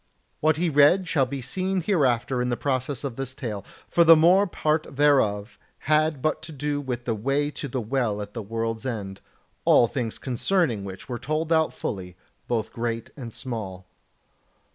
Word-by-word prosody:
What 155 Hz, 0 st, +3 dB
he 175 Hz, +2 st, +1 dB
read 155 Hz, +5 st, +5 dB
shall 140 Hz, -6 st, +2 dB
be 135 Hz, 0 st, -5 dB
seen 185 Hz, +6 st, -1 dB
hereafter 130 Hz, -, +1 dB
in 125 Hz, -, 0 dB
the 120 Hz, -, -1 dB
process 130 Hz, -1 st, -2 dB
of 135 Hz, -5 st, -4 dB
this 130 Hz, -1 st, -4 dB
tale; 105 Hz, -7 st, -5 dB, 0.2 s
for 170 Hz, -, +4 dB
the 165 Hz, 0 st, +9 dB
more 180 Hz, +6 st, +5 dB
part 155 Hz, -2 st, 0 dB
thereof 120 Hz, -8 st, +2 dB, 0.3 s
had 155 Hz, -2 st, +2 dB
but 155 Hz, -, 0 dB
to 160 Hz, -, -8 dB
do 145 Hz, 0 st, -2 dB
with 125 Hz, -3 st, -4 dB
the 115 Hz, -, 0 dB
way 135 Hz, +7 st, 0 dB
to 145 Hz, -, -5 dB
the 130 Hz, -1 st, -3 dB
Well 115 Hz, -2 st, -1 dB
at 105 Hz, 0 st, -6 dB
the 115 Hz, -, -4 dB
World's 115 Hz, +2 st, -3 dB
End, 100 Hz, -5 st, -5 dB, 0.4 s
all -, -, +6 dB
things 120 Hz, -2 st, -3 dB
concerning 130 Hz, -, 0 dB
which 95 Hz, +3 st, -8 dB
were 120 Hz, -3 st, -4 dB
told 155 Hz, +3 st, -1 dB
out 160 Hz, -1 st, +3 dB
fully, 90 Hz, -3 st, -5 dB, 0.3 s
both 115 Hz, -3 st, -2 dB
great 115 Hz, -1 st, -3 dB
and 120 Hz, -5 st, -7 dB
small. 105 Hz, -7 st, -6 dB
130 Hz, 180 wpm, -25 LUFS, 115-155 Hz, 0.4 s, the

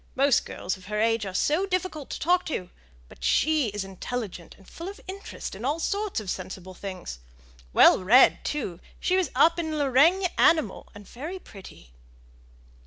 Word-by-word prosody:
Most 275 Hz, -1 st, +3 dB
girls 190 Hz, -, -4 dB
of 185 Hz, -, -16 dB
her 210 Hz, +1 st, -2 dB
age 225 Hz, -1 st, +1 dB
are 190 Hz, -, -6 dB
so 315 Hz, -, +1 dB
difficult 365 Hz, -6 st, -3 dB
to -, -, -5 dB
talk 360 Hz, +3 st, +2 dB
to; 185 Hz, -, -4 dB, 0.4 s
but -, -, -15 dB
she 300 Hz, -, +2 dB
is 205 Hz, -1 st, -4 dB
intelligent 195 Hz, -1 st, -6 dB
and 195 Hz, -, -20 dB
full 335 Hz, -, -8 dB
of 405 Hz, -, -10 dB
interest 390 Hz, +1 st, -7 dB
in 195 Hz, +4 st, -9 dB
all 290 Hz, +5 st, 0 dB
sorts 405 Hz, -, -1 dB
of 215 Hz, -, -9 dB
sensible 185 Hz, 0 st, -6 dB
things; 185 Hz, -, -7 dB, 0.5 s
well 185 Hz, -, +6 dB
read, 245 Hz, +8 st, +6 dB
too 200 Hz, -, -3 dB, 0.2 s
she 370 Hz, -, +1 dB
was 375 Hz, -2 st, +1 dB
up 335 Hz, +1 st, +4 dB
in 315 Hz, -2 st, -2 dB
Le 285 Hz, -2 st, 0 dB
RĆgne 340 Hz, +9 st, +5 dB
Animal 310 Hz, -, +3 dB
and 205 Hz, -1 st, -12 dB
very 310 Hz, +10 st, -7 dB
pretty!" 190 Hz, -, -14 dB
260 Hz, 175 wpm, -26 LUFS, -, 0.5 s, well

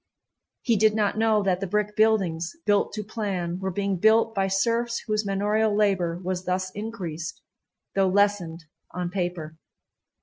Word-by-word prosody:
He 230 Hz, -3 st, +2 dB
did 215 Hz, +1 st, +4 dB
not 210 Hz, -2 st, +1 dB
know 220 Hz, -2 st, +3 dB
that 185 Hz, -2 st, +1 dB
the 195 Hz, -, -3 dB
brick 210 Hz, +2 st, -1 dB
buildings, 195 Hz, -7 st, +2 dB
built 205 Hz, -1 st, +2 dB
to 215 Hz, 0 st, -4 dB
plan, 195 Hz, -5 st, -3 dB
were 190 Hz, 0 st, -2 dB
being 195 Hz, +1 st, -1 dB
built 220 Hz, +4 st, +4 dB
by 195 Hz, -2 st, +1 dB
serfs 235 Hz, +4 st, 0 dB
whose 215 Hz, -1 st, -1 dB
manorial 205 Hz, +2 st, +1 dB
labor 185 Hz, -5 st, +1 dB
was 185 Hz, 0 st, -3 dB
thus 185 Hz, +1 st, -1 dB
increased, 190 Hz, -6 st, -6 dB, 0.5 s
though 195 Hz, -1 st, +2 dB
lessened 190 Hz, -4 st, +1 dB, 0.3 s
on 180 Hz, 0 st, -4 dB
paper. 175 Hz, -4 st, -4 dB
200 Hz, 155 wpm, -25 LUFS, 180-215 Hz, 0.5 s, did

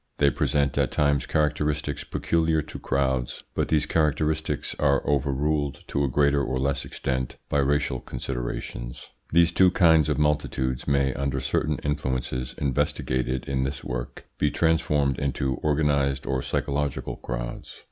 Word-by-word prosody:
They 70 Hz, -1 st, +4 dB
present 70 Hz, +2 st, +1 dB
at -, -, +2 dB
times 70 Hz, -2 st, +1 dB
characteristics 75 Hz, -1 st, 0 dB
peculiar 80 Hz, -2 st, +1 dB
to -, -, -8 dB
crowds, 65 Hz, -2 st, -1 dB
but -, -, 0 dB
these 75 Hz, -2 st, +2 dB
characteristics 80 Hz, 0 st, 0 dB
are 70 Hz, -2 st, +2 dB
overruled 70 Hz, +1 st, 0 dB
to 70 Hz, -, 0 dB
a -, -, +2 dB
greater 70 Hz, +2 st, +3 dB
or 65 Hz, -, -1 dB
less 70 Hz, +1 st, 0 dB
extent 65 Hz, -1 st, -3 dB
by 70 Hz, -, +2 dB
racial 70 Hz, -2 st, +1 dB
considerations. -, -, -5 dB, 0.2 s
These 85 Hz, 0 st, +5 dB
two 95 Hz, +1 st, +5 dB
kinds 80 Hz, -4 st, +4 dB
of -, -, +1 dB
multitudes 75 Hz, -4 st, 0 dB
may, 70 Hz, -1 st, +2 dB
under 70 Hz, -1 st, -1 dB
certain 70 Hz, +2 st, 0 dB
influences 65 Hz, -3 st, -2 dB
investigated 65 Hz, -2 st, -1 dB
in 65 Hz, -1 st, 0 dB
this 70 Hz, +1 st, -4 dB
work, 60 Hz, -1 st, -5 dB
be 75 Hz, -, +3 dB
transformed 75 Hz, -4 st, +1 dB
into 70 Hz, -2 st, -1 dB
organised 70 Hz, -3 st, +1 dB
or 65 Hz, -2 st, 0 dB
psychological 70 Hz, +1 st, -2 dB
crowds. -, -, -6 dB
70 Hz, 140 wpm, -26 LUFS, 65-75 Hz, 0.2 s, These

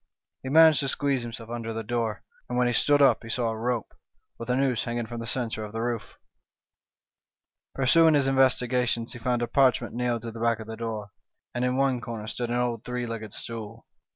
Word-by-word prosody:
" -, -, -63 dB
He 130 Hz, -, -5 dB
managed 160 Hz, +1 st, +7 dB
to 140 Hz, -, -1 dB
squeeze 140 Hz, -1 st, 0 dB
himself 115 Hz, -1 st, -7 dB
under 115 Hz, -1 st, -4 dB
the 115 Hz, 0 st, -4 dB
door, 115 Hz, -1 st, -2 dB, 0.3 s
and 125 Hz, -, -2 dB
when 125 Hz, -, +3 dB
he 120 Hz, -, +1 dB
stood 145 Hz, +4 st, +4 dB
up 135 Hz, -, +5 dB
he 115 Hz, -, -10 dB
saw 115 Hz, 0 st, 0 dB
a -, -, -4 dB
rope, 115 Hz, 0 st, -2 dB, 0.5 s
with 115 Hz, -, -7 dB
a 125 Hz, -, +2 dB
noose 130 Hz, -3 st, +1 dB
hang 120 Hz, 0 st, -3 dB
ing 120 Hz, -, -2 dB
from 120 Hz, +1 st, -6 dB
the 115 Hz, -, -5 dB
centre 115 Hz, -3 st, -2 dB
of 105 Hz, 0 st, -8 dB
the 115 Hz, -, -3 dB
roof. 115 Hz, -4 st, -3 dB, 1.6 s
Pursuing 160 Hz, +4 st, +5 dB
his 140 Hz, -2 st, +3 dB
investi 130 Hz, -2 st, +3 dB
gations, 120 Hz, -2 st, 0 dB
he 120 Hz, -, -8 dB
found 120 Hz, 0 st, 0 dB
a -, -, -1 dB
parchment 130 Hz, -2 st, +2 dB
nailed 120 Hz, -1 st, -1 dB
to 115 Hz, -, -5 dB
the 115 Hz, -, -9 dB
back 115 Hz, -1 st, +2 dB
of 110 Hz, -, -7 dB
the 110 Hz, +1 st, -7 dB
door, 110 Hz, -3 st, -5 dB, 0.4 s
and 120 Hz, -, -1 dB
in 125 Hz, 0 st, +1 dB
one 135 Hz, -2 st, +2 dB
corner 115 Hz, -3 st, -6 dB
stood 120 Hz, +2 st, -4 dB
an 120 Hz, -, -1 dB
old 120 Hz, -2 st, -1 dB
three 125 Hz, 0 st, -3 dB
legged 110 Hz, -2 st, -6 dB
stool. 115 Hz, 0 st, -7 dB
120 Hz, 230 wpm, -27 LUFS, 115-125 Hz, 1.6 s, managed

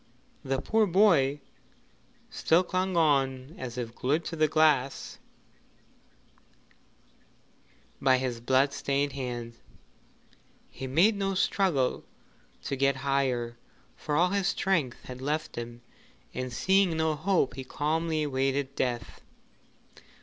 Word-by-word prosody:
The 135 Hz, -1 st, -1 dB
poor 220 Hz, +9 st, +2 dB
boy 165 Hz, -8 st, +3 dB, 0.9 s
still 165 Hz, +3 st, +3 dB
clung 185 Hz, 0 st, -1 dB
on 135 Hz, -3 st, +1 dB
as 125 Hz, -2 st, -6 dB
if 120 Hz, -2 st, -4 dB
glued 150 Hz, +8 st, -1 dB
to 165 Hz, -, -4 dB
the 155 Hz, -1 st, +3 dB
glass 150 Hz, -4 st, +1 dB, 2.8 s
by 130 Hz, -1 st, +4 dB
his 125 Hz, -2 st, -3 dB
blood 135 Hz, +3 st, +2 dB
stained 140 Hz, 0 st, -1 dB
hands. 120 Hz, -3 st, -5 dB, 1.1 s
He 135 Hz, -, -6 dB
made 175 Hz, +12 st, +4 dB
no 195 Hz, -1 st, -1 dB
struggle 180 Hz, -9 st, +1 dB, 0.6 s
to 140 Hz, -, -2 dB
get 135 Hz, 0 st, +2 dB
higher, 125 Hz, -4 st, 0 dB, 0.4 s
for 150 Hz, -, -3 dB
all 175 Hz, +4 st, +4 dB
his 200 Hz, -1 st, +1 dB
strength 165 Hz, -12 st, 0 dB
had 125 Hz, 0 st, -9 dB
left 150 Hz, +3 st, -2 dB
him, 120 Hz, 0 st, -7 dB, 0.5 s
and 130 Hz, 0 st, -4 dB
seeing 190 Hz, +5 st, +2 dB
no 160 Hz, 0 st, +1 dB
hope 160 Hz, -3 st, +1 dB
he 130 Hz, +1 st, -6 dB
calmly 155 Hz, +3 st, -1 dB
awaited 135 Hz, -1 st, -1 dB
death. 120 Hz, -2 st, -3 dB
140 Hz, 115 wpm, -28 LUFS, 130-165 Hz, 2.8 s, by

